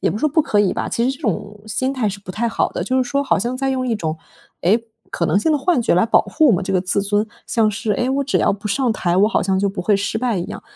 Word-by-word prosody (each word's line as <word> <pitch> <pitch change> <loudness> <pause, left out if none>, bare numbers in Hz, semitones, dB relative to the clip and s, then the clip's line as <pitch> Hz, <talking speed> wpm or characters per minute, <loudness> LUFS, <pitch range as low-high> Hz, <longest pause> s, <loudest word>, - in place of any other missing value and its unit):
也 - - +1
不 - - -3
是 - - -5
说 305 - +2
不 315 - +3
可 210 -8 +1
以 195 - +2
吧， - - -3
其 235 - 0
实 - - +2
这 275 - -16
种 210 - -3
心 260 +6 -1
态 250 -5 0
是 200 0 -5
不 185 - -8
太 235 +4 -1
好 - - 0
的。 - - -3
就 260 - -1
是 255 - +2
说 280 +3 0
好 275 - +1
像 240 +6 -2
在 270 0 -1
用 255 -1 -1
一 235 - 0
种 160 -6 -3 0.5
诶 225 +6 +2 0.2
可 - - -2
能 - - +2
性 315 +10 +1
的 300 - +3
幻 335 -2 +2
觉 225 - +2
来 180 +4 +4
保 230 - +4
护 315 - +2
我 - - +5
们 190 0 +1
这 195 - -2
个 185 - +2
自 185 +2 0
尊， 205 +1 0 0.2
像 220 -2 +2
是 215 0 -2
诶 245 - 0
我 280 +1 0
只 280 - +1
要 - - +2
不 205 +2 -6
上 245 +2 +1
台， 175 -3 0
我 205 +2 +4
好 - - +1
像 190 0 +1
就 200 +1 +1
不 195 -1 -4
会 205 +2 +3
失 200 +2 -2
败 240 -4 0
一 175 - -2
样。 - - -8
220 Hz, 350 characters per minute, -20 LUFS, 200-255 Hz, 0.5 s, 我